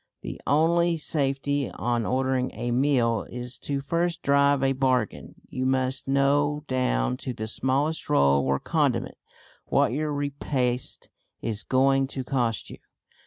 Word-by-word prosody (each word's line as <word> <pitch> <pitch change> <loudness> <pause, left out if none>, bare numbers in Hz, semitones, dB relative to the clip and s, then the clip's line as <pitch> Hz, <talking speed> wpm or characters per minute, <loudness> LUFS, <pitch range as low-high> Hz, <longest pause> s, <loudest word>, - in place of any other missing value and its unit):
The - - -7
only 165 +3 +3
safety 140 -2 0
on 120 -2 -1
ordering 130 0 0
a 120 0 -3
meal 120 -3 +2
is 125 +1 -6
to 140 -1 -3
first 170 +4 -1
drive 140 -1 +3
a 135 0 +3
bargain. 130 -4 -1
You 130 0 -2
must 130 0 0
know 145 +2 +2
down 65 - 0
to 130 - -5
the 110 -1 -5
smallest 140 +8 -1
roll 70 - +4
or 70 +1 +1
condiment - - 0 0.5
what - - +2
your 150 +3 -1
repast 140 -3 -2 0.3
is 110 -3 -1
going 135 +1 +2
to 130 - -1
cost 120 -4 -1
you. - - -9
135 Hz, 140 wpm, -26 LUFS, 125-145 Hz, 0.5 s, roll